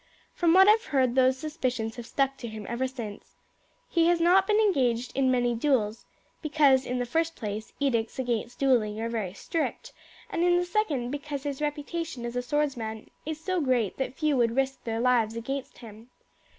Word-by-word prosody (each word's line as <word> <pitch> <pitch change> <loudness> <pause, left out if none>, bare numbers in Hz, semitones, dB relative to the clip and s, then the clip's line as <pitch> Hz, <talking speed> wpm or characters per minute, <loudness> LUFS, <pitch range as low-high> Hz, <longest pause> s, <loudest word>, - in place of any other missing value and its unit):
"From 335 -2 +3
what 380 +1 +8
I - - +9
have 445 +2 +2
heard 260 -4 +1
those 260 0 +3
suspicions 255 -7 -3
have 240 -1 -8
stuck 275 -1 0
to 240 - -6
him 220 -2 -7
ever 240 +3 -1
since. 230 -6 -8 0.5
He 335 -1 +2
has 345 0 +3
not 365 +3 +4
been 425 - +3
engaged 255 - +1
in 265 -1 +2
many 245 -1 +2
duels, 230 -4 0 0.3
because 290 -4 +3
in 250 - -1
the 245 - -1
first 325 +6 0
place 215 -1 -5
edicts 235 -5 0
against 240 -2 -2
duelling 230 -6 +2
are 230 +1 -2
very 215 -6 -3
strict, 320 +9 -3 0.4
and 335 - 0
in 350 0 +4
the 355 - +1
second 315 - -1
because 285 -1 -5
his 285 -1 -4
reputation 295 -2 -3
as 240 0 -5
a 245 - 0
swordsman 245 -5 -2 0.2
is 315 -1 -3
so 365 +2 -1
great 250 -8 +1
that 265 -1 -3
few 305 -2 +1
would 230 -1 +2
risk 270 0 -1
their 225 -1 -2
lives 235 -3 +2
against 270 +4 -5
him. 225 0 -13
260 Hz, 190 wpm, -27 LUFS, 235-305 Hz, 0.5 s, I